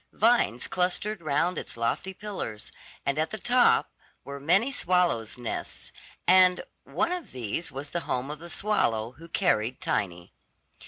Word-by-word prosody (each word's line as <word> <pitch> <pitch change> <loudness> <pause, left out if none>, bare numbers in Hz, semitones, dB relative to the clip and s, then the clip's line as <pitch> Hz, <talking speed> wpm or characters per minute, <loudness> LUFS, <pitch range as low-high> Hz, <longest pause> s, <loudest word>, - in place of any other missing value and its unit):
Vines 220 - +3
clustered 185 +2 -1
round 160 +4 +1
its - - -8
lofty 115 +11 -1
pillars, 190 - -6 0.3
and 140 +2 0
at 155 - +1
the 220 - -5
top 245 +4 +3 0.3
were 140 0 -7
many 190 - +3
swallows' 180 - +1
nests, 120 -2 -5 0.4
and 185 -1 +6 0.2
one 340 - 0
of 360 -2 -4
these 125 +6 -3
was 140 +1 -6
the 170 - -1
home 130 +3 -1
of 150 - -7
the 170 +1 -10
swallow 115 - 0
who 165 - -11
carried 130 - +1
Tiny. 90 -3 -2
165 Hz, 150 wpm, -27 LUFS, 125-190 Hz, 0.4 s, and